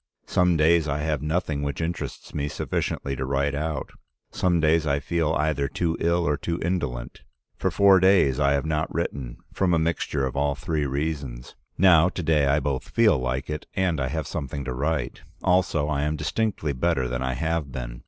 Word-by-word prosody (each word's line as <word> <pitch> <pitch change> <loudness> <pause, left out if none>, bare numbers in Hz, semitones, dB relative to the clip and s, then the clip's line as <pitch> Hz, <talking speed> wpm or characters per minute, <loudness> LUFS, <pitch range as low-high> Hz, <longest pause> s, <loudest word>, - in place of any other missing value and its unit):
Some 90 -2 +2
days 80 +1 +4
I 70 -1 -1
have 75 -2 -1
nothing 75 -2 -1
which 70 -2 -3
interests 85 +1 -4
me 70 -1 -2
sufficiently 70 -1 -2
to 65 - -3
write 70 +2 0
out, 75 -1 -3 0.4
some 90 -2 +1
days 80 0 +3
I 70 0 +1
feel 80 +2 0
either 75 -2 0
too 85 +4 -1
ill 85 +1 +1
or 75 0 +1
too 85 +1 -3
indolent. 75 -9 -3 0.3
For - - 0
four 100 -1 +5
days 90 -8 +4
I 70 -1 +3
have 70 +1 0
not 80 0 -1
written, 65 -4 -3 0.2
from 90 -3 +2
a - - +3
mixture 80 -4 0
of 65 0 -4
all 70 0 +1
three 75 -1 -2
reasons. 70 -3 -4 0.2
Now, 90 -2 +6
to 90 - -5
day 75 -3 +3
I 70 +2 +3
both 70 -1 -3
feel 110 - +4
like 65 +1 -2
it 75 0 -5
and 90 -5 +1
I 65 - 0
have 80 +4 -3
something 70 -3 -5
to 65 - -3
write. 75 +4 -2 0.2
Also 90 -5 +2
I 75 -2 0
am 75 +1 0
distinctly 80 0 -1
better 65 -1 0
than 60 +1 -3
I 65 0 -1
have 80 0 -2
been. - - -6
75 Hz, 195 wpm, -25 LUFS, 70-85 Hz, 0.4 s, Now